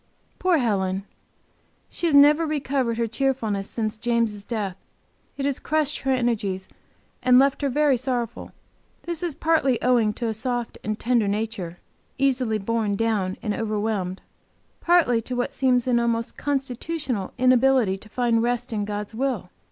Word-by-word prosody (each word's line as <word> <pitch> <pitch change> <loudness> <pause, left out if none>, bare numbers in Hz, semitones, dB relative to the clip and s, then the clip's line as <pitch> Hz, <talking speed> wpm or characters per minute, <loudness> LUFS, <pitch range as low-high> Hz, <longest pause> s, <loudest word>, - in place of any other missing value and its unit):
Poor 370 -2 +3
Helen! 195 -6 0 0.8
She 345 - -2
has 305 - +2
never 295 +3 +7
recovered 270 -5 -1
her 230 - +1
cheerfulness 225 -4 -1
since 215 -2 -3
James' 230 -3 0
death. 205 -5 -3 0.6
It 275 - -2
has 280 -2 0
crushed 305 -1 0
her 270 - -1
energies 215 -7 -1 0.5
and 250 0 +5
left 275 +2 +3
her 280 - +1
very 290 0 +3
sorrowful. 240 -2 -3 0.5
This 340 -2 -2
is 345 -5 -2
partly 310 -6 +2
owing 240 -4 +3
to 235 - -4
a 225 - 0
soft 240 +1 -3
and 215 0 -3
tender 235 -3 +2
nature, 200 -4 -3 0.4
easily 255 -5 +1
borne 215 0 -1
down 205 -4 0
and 210 -3 -1
overwhelmed, 210 -4 -2 0.6
partly 335 -10 +3
to 250 +2 -5
what 245 - -2
seems 250 -2 +2
an 245 -2 +2
almost 230 -1 -1
constitutional 270 - -3
inability 255 -5 +3
to 215 - -11
find 235 0 +1
rest 245 +1 -1
in 205 -2 -1
God's 210 +1 -4
will. 235 -6 -2
235 Hz, 150 wpm, -24 LUFS, 215-270 Hz, 0.8 s, never